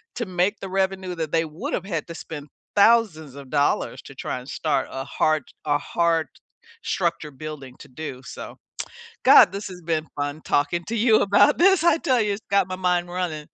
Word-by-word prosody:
to 240 - -2
make 185 +3 0
the 195 - -6
revenue 190 -1 -1
that 160 -3 -4
they 165 0 +2
would've 180 - -4
had 165 -6 -3
to 170 - -7
spend 150 -3 -8 0.3
thousands 200 - +3
of 140 -2 -11
dollars 145 -1 +1
to - - -12
try - - -4
and 125 - -13
start 145 -4 -1
a 135 - -4
hard 155 -1 +1 0.2
a 145 -1 +2
hard 165 -1 0 0.6
structure 150 -1 -1
building 140 -2 -8
to - - -12
do 135 -1 -7
so. - - -9 0.7
God, - - +8
this 200 +2 -5
has 180 -2 -10
been 160 -1 -1
fun 145 +1 -3
talking 155 +4 0
to 230 - -2
you 220 0 +4
about 205 +9 +4
this. 375 -1 +5
I 340 - +5
tell 255 -6 +2
you, 210 -1 +1
it's 200 - -5
got 200 -2 +3
my 185 - -4
mind 180 -1 0
running. 175 -4 -3
170 Hz, 195 wpm, -24 LUFS, 150-195 Hz, 0.7 s, God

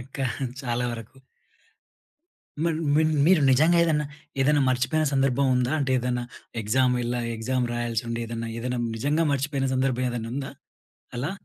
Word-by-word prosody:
ఇంకా 135 +2 -5 0.4
చాలా 125 -2 -1
వరకు 115 +3 -9 1.4
మన్ 165 -2 +1 0.2
మన్ 155 +1 +3 0.2
మీరు 180 -2 +5
నిజంగా 160 +6 +4
ఏదైనా 150 -3 +1 0.3
ఏదైనా 145 +1 +4
మర్చిపోయిన 130 +5 +1
సందర్భం 135 0 +2
ఉందా? 125 +2 +1
అంటే 135 -2 0
ఏదన్నా 125 0 -1 0.4
ఎగ్జామ్ 125 +4 +2
ఎళ్ల 120 +1 -2
ఆ 115 - -3
ఎగ్జామ్ 125 +2 -1
రాయాల్సి 120 -1 -1
ఉండి, 115 0 -2
ఏదైనా, 115 0 -4
ఏదైనా 125 +1 -2 0.2
నిజంగా 145 +8 +1
మర్చిపోయిన 140 0 -1
సందర్భం 130 -1 +1
ఏదైనా 115 -2 -4
ఉందా 135 0 -4 0.7
అలా? 135 +7 -2
130 Hz, 145 wpm, -25 LUFS, 120-140 Hz, 1.4 s, మీరు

